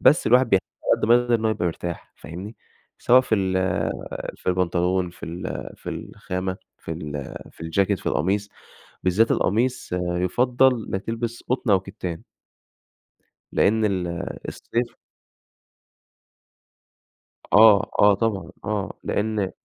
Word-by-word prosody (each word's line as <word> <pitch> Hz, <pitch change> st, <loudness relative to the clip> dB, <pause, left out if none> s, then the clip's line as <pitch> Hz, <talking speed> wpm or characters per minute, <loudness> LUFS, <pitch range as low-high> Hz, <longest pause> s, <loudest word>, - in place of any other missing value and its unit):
بس 150 Hz, -, +5 dB
الواحد 125 Hz, +1 st, +5 dB
بيحتاج 95 Hz, -1 st, +3 dB, 0.2 s
علي -, -, +3 dB
قد -, -, +1 dB
ما 120 Hz, -, +8 dB
يقدَر 120 Hz, -1 st, +1 dB
إن 110 Hz, -1 st, 0 dB
هو 110 Hz, -, +3 dB
يبقى 90 Hz, -5 st, -1 dB
مرتاح، 85 Hz, +1 st, -5 dB
فاهمني، 95 Hz, +7 st, -8 dB, 0.4 s
سواء 125 Hz, +2 st, +6 dB
في 125 Hz, -3 st, 0 dB
ال 95 Hz, -2 st, 0 dB, 0.8 s
في -, -, -6 dB
البنطلون، 90 Hz, 0 st, +1 dB
في 85 Hz, -, -10 dB
ال 85 Hz, +2 st, -5 dB
في -, -, -10 dB
الخامة 95 Hz, 0 st, -4 dB, 0.2 s
في -, -, -9 dB
ال 75 Hz, -4 st, -6 dB, 0.2 s
في -, -, -23 dB
الجاكيت، 95 Hz, +4 st, +1 dB
في -, -, -14 dB
القميص، 100 Hz, +5 st, 0 dB, 0.5 s
بالذات 100 Hz, +5 st, +3 dB
القميص، 120 Hz, +6 st, +1 dB
يُفضّل 115 Hz, +8 st, +2 dB
إنّك 95 Hz, +1 st, -2 dB
تلبِس 115 Hz, +1 st, -4 dB
قطن 125 Hz, -3 st, +1 dB
أو 95 Hz, -2 st, +5 dB
كِتّان. 95 Hz, -4 st, -6 dB, 1.3 s
لأن 110 Hz, +1 st, +3 dB
ال 95 Hz, -3 st, 0 dB, 0.4 s
الصيف 120 Hz, +1 st, -3 dB, 2.6 s
آه، 105 Hz, -1 st, +7 dB
آه 105 Hz, 0 st, +7 dB
طبعًا، 110 Hz, -2 st, -2 dB
آه، 105 Hz, -2 st, -2 dB
لأن 105 Hz, -2 st, -1 dB
100 Hz, 130 wpm, -24 LUFS, 90-115 Hz, 2.6 s, ما